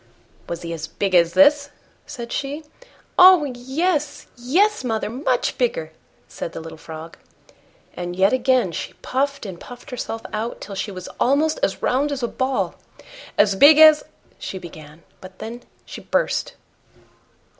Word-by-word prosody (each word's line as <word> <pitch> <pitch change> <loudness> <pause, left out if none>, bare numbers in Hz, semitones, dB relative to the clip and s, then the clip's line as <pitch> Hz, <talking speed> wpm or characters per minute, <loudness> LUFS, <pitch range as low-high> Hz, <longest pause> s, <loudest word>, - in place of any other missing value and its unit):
"Was 170 0 -5
he 170 0 -4
as 160 -1 -5
big 195 -2 -3
as 170 -1 +4
this?" 285 0 +5 0.4
said 235 -5 -7
she. 285 +3 -4 0.6
"Oh! 365 -3 +9
yes, 285 +5 -2
yes, 340 - +1
mother, 220 -3 -2
MUCH 255 0 -1
bigger," 165 -11 -1 0.4
said 165 - -7
the - - -6
little 160 0 -9
Frog. 160 +1 -10 0.8
And 175 0 -5
yet 190 +4 +3
again 255 -6 +2
she - - -5
puffed 275 -1 -1
and 185 -4 -7
puffed 245 +1 -12
herself 225 -2 -5
out 220 +2 -3
till 200 - -8
she 195 +2 -3
was 185 -2 -8
almost 300 +5 +2
as 195 - -1
round 280 +4 +1
as 270 -3 -4
a - - +1
ball. 260 +2 -1 0.6
"As 205 -1 +4
big 290 +9 +8
as...?" 310 -1 +8 0.4
she 190 - -6
began 160 -3 -12 0.2
but 185 0 -12
then 235 +2 -7 0.2
she - - -9
burst. - - -1
245 Hz, 155 wpm, -21 LUFS, 185-285 Hz, 0.8 s, Oh